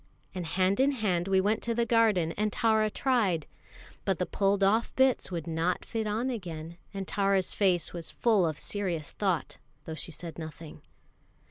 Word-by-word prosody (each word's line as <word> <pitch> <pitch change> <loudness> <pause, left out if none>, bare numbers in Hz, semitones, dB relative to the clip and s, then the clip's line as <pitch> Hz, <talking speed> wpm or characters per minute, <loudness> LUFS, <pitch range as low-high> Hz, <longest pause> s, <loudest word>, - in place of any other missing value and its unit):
And 180 -3 -4
hand 185 +4 +1
in 275 +2 +4
hand 190 -8 0
we 190 -1 +3
went 210 +3 +1
to 235 -1 -1
the 235 0 +2
garden, 220 -8 +3
and 210 +4 -1
Tara 220 -1 +2
tried. 210 - +1 0.6
But 195 -3 0
the 180 - 0
pulled 200 +1 +1
off 220 +4 +2
bits 265 -1 +3
would 170 -3 -3
not 165 +2 -1
fit 220 -1 -2
on 225 +5 0
again; 170 -6 -6
and 195 -2 -5
Tara's 195 -2 +1
face 180 -5 +1
was 170 -2 -6
full 215 -7 +2
of 155 -2 -3
serious 180 -7 -3
thought, 190 -5 -1 0.3
though 160 - -5
she 160 - -6
said 165 +1 -7
nothing. 160 0 -9
195 Hz, 175 wpm, -29 LUFS, 170-220 Hz, 0.6 s, in